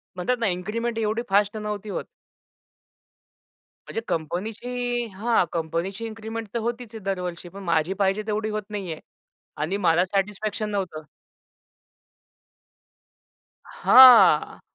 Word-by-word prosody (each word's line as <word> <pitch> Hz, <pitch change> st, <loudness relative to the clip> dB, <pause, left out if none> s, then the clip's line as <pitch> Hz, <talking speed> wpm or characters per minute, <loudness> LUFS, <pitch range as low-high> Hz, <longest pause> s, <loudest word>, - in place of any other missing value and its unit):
म्हणतात 245 Hz, +8 st, -1 dB
ना 230 Hz, -, +1 dB
इन्क्रिमेंट 215 Hz, +6 st, -3 dB
एवढी 220 Hz, +1 st, 0 dB
फास्ट 205 Hz, +2 st, +2 dB
नव्हती 210 Hz, -1 st, -5 dB
होत. -, -, -3 dB, 1.8 s
म्हणजे 225 Hz, -, -4 dB
कंपनीची, 235 Hz, +9 st, -3 dB
हां, 225 Hz, +2 st, +2 dB
कंपनीची 170 Hz, +6 st, -3 dB
इन्क्रिमेंट 225 Hz, 0 st, -6 dB
तर 235 Hz, -, -1 dB
होतीच 235 Hz, 0 st, -4 dB
आहे -, -, -6 dB
दरवर्षी. 180 Hz, -3 st, -4 dB
पण 195 Hz, +2 st, -10 dB
माझी 170 Hz, +1 st, +1 dB
पाहिजे 195 Hz, +1 st, 0 dB
तेवढी 215 Hz, 0 st, -1 dB
होत 215 Hz, 0 st, -2 dB
नाहीये 190 Hz, -7 st, -5 dB, 0.6 s
आणि 170 Hz, +6 st, -1 dB
मला 175 Hz, -2 st, +3 dB
सॅटिस्फॅक्शन 210 Hz, +2 st, -2 dB
नव्हतं. 185 Hz, -7 st, -3 dB, 2.6 s
हां. 255 Hz, -2 st, +7 dB
210 Hz, 110 wpm, -24 LUFS, 185-225 Hz, 2.6 s, हां